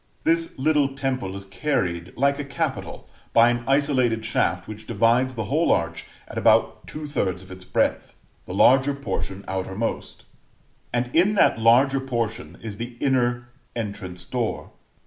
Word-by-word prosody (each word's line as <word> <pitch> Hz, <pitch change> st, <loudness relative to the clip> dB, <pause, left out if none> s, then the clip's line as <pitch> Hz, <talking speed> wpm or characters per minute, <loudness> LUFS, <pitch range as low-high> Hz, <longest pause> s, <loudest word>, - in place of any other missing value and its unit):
This 165 Hz, 0 st, +1 dB
little 140 Hz, -1 st, +2 dB
temple 130 Hz, -8 st, -2 dB
is 100 Hz, 0 st, -7 dB
carried, 95 Hz, -, -2 dB
like 140 Hz, +2 st, +2 dB
a -, -, -2 dB
capital, 140 Hz, +1 st, -4 dB, 0.3 s
by 115 Hz, +1 st, +6 dB
an 120 Hz, 0 st, -2 dB
isolated 130 Hz, -5 st, +2 dB
shaft 90 Hz, -4 st, 0 dB
which 110 Hz, 0 st, -9 dB
divides 115 Hz, +4 st, +2 dB
the 110 Hz, -, -2 dB
whole 150 Hz, +10 st, +1 dB
arch 85 Hz, 0 st, 0 dB, 0.2 s
at -, -, -4 dB
about -, -, +3 dB
2/3 145 Hz, -, -2 dB
of 95 Hz, -, -14 dB
its 95 Hz, 0 st, -9 dB
breadth, -, -, -1 dB, 0.3 s
the -, -, -5 dB
larger 135 Hz, +2 st, +5 dB
portion 100 Hz, -8 st, -4 dB
outmost; 95 Hz, +4 st, -3 dB, 0.7 s
and 120 Hz, +1 st, -2 dB
in 190 Hz, +6 st, +4 dB
that 155 Hz, -, +4 dB
larger 130 Hz, +5 st, +5 dB
portion 120 Hz, -3 st, -3 dB
is 105 Hz, -3 st, -6 dB
the 120 Hz, +2 st, -6 dB
inner 120 Hz, -3 st, +1 dB, 0.3 s
entrance 100 Hz, -5 st, -5 dB
door. 120 Hz, -3 st, -3 dB
120 Hz, 145 wpm, -24 LUFS, 100-135 Hz, 0.7 s, by